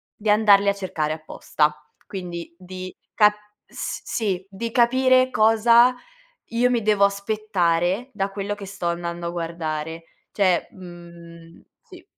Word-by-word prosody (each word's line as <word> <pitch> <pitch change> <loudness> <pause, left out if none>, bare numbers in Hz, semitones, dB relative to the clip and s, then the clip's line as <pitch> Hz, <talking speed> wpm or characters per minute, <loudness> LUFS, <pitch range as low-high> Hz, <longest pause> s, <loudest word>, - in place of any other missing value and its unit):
di 215 0 -3
andarli 205 -1 +5
a - - +2
cercare 160 -6 -3
apposta, 155 -1 -1 0.3
quindi 175 -3 -7
di 185 0 -8 0.2
ca 210 -1 +5 0.3
s - - -6
sì, 195 -5 -2
di 225 +4 -5
capire 255 +1 +3
cosa 230 +3 +5 0.5
io 240 +2 +1
mi 240 -2 +1
devo 210 -1 +3
aspettare 200 0 0
da 195 -1 -2
quello 200 +1 -4
che 200 -1 -9
sto 200 -2 -6
andando 170 0 -4
a - - -3
guardare. 165 -1 -4 0.3
Cioè, 185 -4 +1
mhmm, 170 -2 -13 0.2
sì. - - -15
195 Hz, 135 wpm, -23 LUFS, 170-215 Hz, 0.5 s, andarli